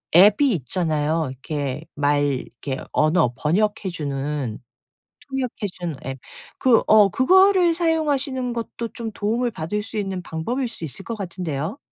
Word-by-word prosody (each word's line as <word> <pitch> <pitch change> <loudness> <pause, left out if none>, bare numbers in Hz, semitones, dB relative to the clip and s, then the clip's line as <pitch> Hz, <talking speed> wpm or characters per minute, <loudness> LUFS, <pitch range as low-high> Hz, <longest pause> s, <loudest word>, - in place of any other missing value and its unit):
앱이 210 +9 +6
있잖아요. 155 +1 0
이렇게 140 +1 -4
말 145 0 +2
이렇게 135 -1 -3
언어 155 -5 +3
번역해 195 +7 +1
주는 140 -6 -3 0.7
통역해 255 -5 -2
주는 175 -4 -4
앱. 135 0 -4 0.4
그 245 -4 +4
어 215 -2 +7
그거를 365 - +5
사용하시는 290 -6 0
것도 230 0 -4
좀 230 -2 -4
도움을 230 +4 0
받을 210 +3 -3
수 225 +1 -10
있는 195 -3 -2
방법일 235 +11 -3
수 200 - -8
있을 160 +6 -6
것 230 - -4
같은데요. 175 - -4
185 Hz, 290 characters per minute, -23 LUFS, 150-240 Hz, 0.7 s, 어